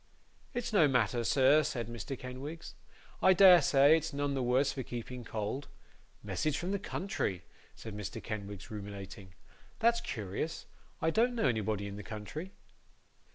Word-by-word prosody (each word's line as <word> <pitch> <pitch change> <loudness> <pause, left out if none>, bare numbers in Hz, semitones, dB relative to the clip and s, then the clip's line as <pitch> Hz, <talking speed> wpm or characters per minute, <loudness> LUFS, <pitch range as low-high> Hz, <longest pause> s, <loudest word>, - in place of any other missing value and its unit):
'It's 245 -2 -3
no 170 -8 +6
matter, 120 -3 +1
sir,' 135 +5 +5
said 120 -5 -2
Mr. 120 +3 -6
Kenwigs. 135 +7 -7 0.5
'I 190 - +7
dare 185 -2 +8
say 140 +2 +6
it's 160 0 -1
none 145 0 -1
the 135 - -1
worse 130 +3 +2
for 135 - -4
keeping 120 0 -6
cold. 110 +5 -4 0.6
Message 155 -2 -1
from 175 +3 -3
the 200 - 0
country!' 180 - -3 0.3
said 110 -2 -8
Mr. 105 -3 -5
Kenwigs, 100 -3 -6
ruminating; 100 -3 -8 0.4
'that's 235 +1 +3
curious. 115 - -4 0.4
I 160 - +3
don't 240 +6 +2
know 230 - 0
anybody 110 -3 -1
in 100 0 -6
the - - -6
country. 110 - -7
130 Hz, 155 wpm, -32 LUFS, 105-160 Hz, 0.6 s, dare